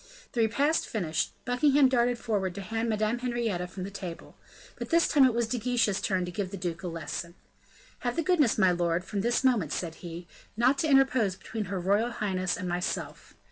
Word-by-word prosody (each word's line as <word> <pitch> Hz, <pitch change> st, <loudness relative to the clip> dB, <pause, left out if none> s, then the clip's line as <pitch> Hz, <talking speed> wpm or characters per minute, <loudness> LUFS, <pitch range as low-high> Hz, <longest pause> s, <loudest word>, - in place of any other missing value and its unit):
The 235 Hz, -, +1 dB
repast 280 Hz, +8 st, +2 dB
finished, 175 Hz, -, -1 dB
Buckingham 270 Hz, +3 st, +4 dB
darted 245 Hz, -1 st, +2 dB
forward 200 Hz, -6 st, -2 dB
to 200 Hz, -, -5 dB
hand 225 Hz, +4 st, -2 dB
Madame 215 Hz, +2 st, 0 dB
Henrietta 235 Hz, -8 st, -2 dB
from 185 Hz, +1 st, -7 dB
the 195 Hz, -, -6 dB
table; 180 Hz, -4 st, -8 dB, 0.4 s
but -, -, -6 dB
this 335 Hz, 0 st, +4 dB
time 285 Hz, -3 st, +5 dB
it 255 Hz, -, +3 dB
was 235 Hz, 0 st, +2 dB
De 245 Hz, +2 st, -2 dB
Guiche's 235 Hz, -5 st, +1 dB
turn 185 Hz, -2 st, 0 dB
to 180 Hz, -, -6 dB
give 195 Hz, 0 st, -3 dB
the 195 Hz, -, -6 dB
duke 175 Hz, -2 st, -4 dB
a 185 Hz, -, -4 dB
lesson. 170 Hz, +1 st, -5 dB, 0.6 s
"Have 245 Hz, -1 st, -2 dB
the 330 Hz, -, 0 dB
goodness, 305 Hz, -8 st, +3 dB
my 190 Hz, -3 st, +5 dB
lord, 175 Hz, 0 st, 0 dB
from 200 Hz, 0 st, -2 dB
this 240 Hz, +4 st, +1 dB
moment," 225 Hz, -, +2 dB
said 170 Hz, -3 st, -3 dB
he, 170 Hz, 0 st, -8 dB, 0.3 s
"not 255 Hz, +4 st, +3 dB
to 315 Hz, -, +1 dB
interpose 260 Hz, -8 st, +3 dB
between 215 Hz, +3 st, -5 dB
her 190 Hz, 0 st, -3 dB
royal 200 Hz, +6 st, +2 dB
highness 190 Hz, -4 st, -1 dB
and 185 Hz, -3 st, -4 dB
myself. 175 Hz, +1 st, -4 dB
215 Hz, 205 wpm, -28 LUFS, 180-245 Hz, 0.6 s, time